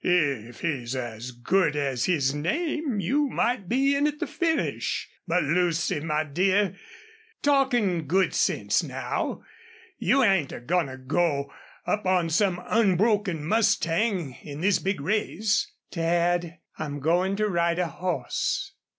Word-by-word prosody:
"If 140 Hz, -10 st, 0 dB
he's 135 Hz, -7 st, -2 dB
as 120 Hz, -1 st, -5 dB
good 150 Hz, +7 st, +1 dB
as 135 Hz, -4 st, 0 dB
his 140 Hz, -7 st, +1 dB
name 270 Hz, -, -1 dB
you 275 Hz, -, +1 dB
might 235 Hz, -7 st, -1 dB
be 275 Hz, +3 st, +3 dB
in 285 Hz, +1 st, +2 dB
at 300 Hz, 0 st, -3 dB
the -, -, -2 dB
finish.... 330 Hz, -2 st, -1 dB, 0.2 s
But, 175 Hz, +1 st, +2 dB
Lucy, 165 Hz, 0 st, +1 dB
my 155 Hz, 0 st, 0 dB
dear, 190 Hz, +5 st, +1 dB, 0.7 s
talkin' 245 Hz, -, +2 dB
good 185 Hz, +5 st, +2 dB
sense -, -, +1 dB
now -, -, -3 dB, 0.6 s
you 270 Hz, 0 st, +3 dB
ain't 190 Hz, -, +3 dB
a -, -, -6 dB
goin' 165 Hz, +6 st, 0 dB
to 130 Hz, 0 st, -8 dB
go 140 Hz, +1 st, 0 dB, 0.3 s
up 210 Hz, -2 st, -1 dB
on 180 Hz, -3 st, +2 dB
some 180 Hz, 0 st, +1 dB
unbroken 205 Hz, -5 st, +2 dB
mustang 195 Hz, -, +1 dB
in 145 Hz, 0 st, -8 dB
this 195 Hz, +2 st, +3 dB
big 195 Hz, -2 st, -1 dB
race?" 210 Hz, +4 st, 0 dB, 0.2 s
"Dad, 170 Hz, 0 st, 0 dB, 0.2 s
I'm 145 Hz, -2 st, -4 dB
going 175 Hz, +6 st, +1 dB
to 215 Hz, +1 st, +1 dB
ride 170 Hz, -3 st, +1 dB
a 180 Hz, -, +1 dB
horse." 170 Hz, -5 st, -2 dB
175 Hz, 140 wpm, -26 LUFS, 150-205 Hz, 0.7 s, be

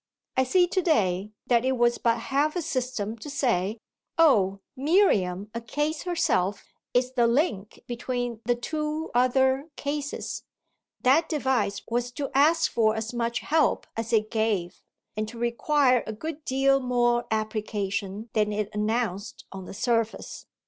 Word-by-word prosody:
I 260 Hz, -, +3 dB
see 355 Hz, +7 st, +4 dB
to 375 Hz, +1 st, 0 dB
day 205 Hz, -, +1 dB
that 240 Hz, -1 st, +3 dB
it 260 Hz, +1 st, +2 dB
was 240 Hz, 0 st, +2 dB
but 230 Hz, -1 st, +2 dB
half 280 Hz, +6 st, 0 dB
a 350 Hz, -, -1 dB
system 240 Hz, -5 st, -3 dB
to 295 Hz, -, -8 dB
say, 230 Hz, -7 st, 0 dB, 0.4 s
"Oh 200 Hz, -, +4 dB, 0.2 s
Miriam, 220 Hz, -, +2 dB
a 230 Hz, -, -4 dB
case 295 Hz, +6 st, -2 dB
herself, 265 Hz, -, 0 dB, 0.2 s
is 250 Hz, +1 st, +1 dB
the 240 Hz, -2 st, +3 dB
link 230 Hz, -, 0 dB
between 245 Hz, -1 st, -3 dB
the 245 Hz, +1 st, +1 dB
two 305 Hz, +5 st, -3 dB
other 265 Hz, +4 st, +2 dB
cases"; 285 Hz, 0 st, -4 dB, 0.6 s
that 280 Hz, +6 st, +4 dB
device 260 Hz, -9 st, 0 dB
was 240 Hz, +1 st, -1 dB
to 280 Hz, 0 st, -4 dB
ask 320 Hz, +4 st, +4 dB
for 220 Hz, -1 st, +2 dB
as 220 Hz, +1 st, -4 dB
much 235 Hz, 0 st, -1 dB
help 315 Hz, +1 st, +2 dB
as 225 Hz, +1 st, -3 dB
it 215 Hz, -2 st, +2 dB
gave 210 Hz, -5 st, -1 dB, 0.3 s
and 215 Hz, 0 st, -2 dB
to 235 Hz, +2 st, -9 dB
require 250 Hz, +2 st, +2 dB
a 220 Hz, -, -3 dB
good 310 Hz, +7 st, -6 dB
deal 275 Hz, +1 st, +3 dB
more 240 Hz, -2 st, +1 dB
application 215 Hz, -1 st, -3 dB
than 210 Hz, -1 st, +2 dB
it 210 Hz, 0 st, -2 dB
announced 210 Hz, -2 st, -2 dB
on 190 Hz, -1 st, -8 dB
the -, -, -8 dB
surface. 230 Hz, 0 st, -1 dB
240 Hz, 150 wpm, -26 LUFS, 215-275 Hz, 0.6 s, see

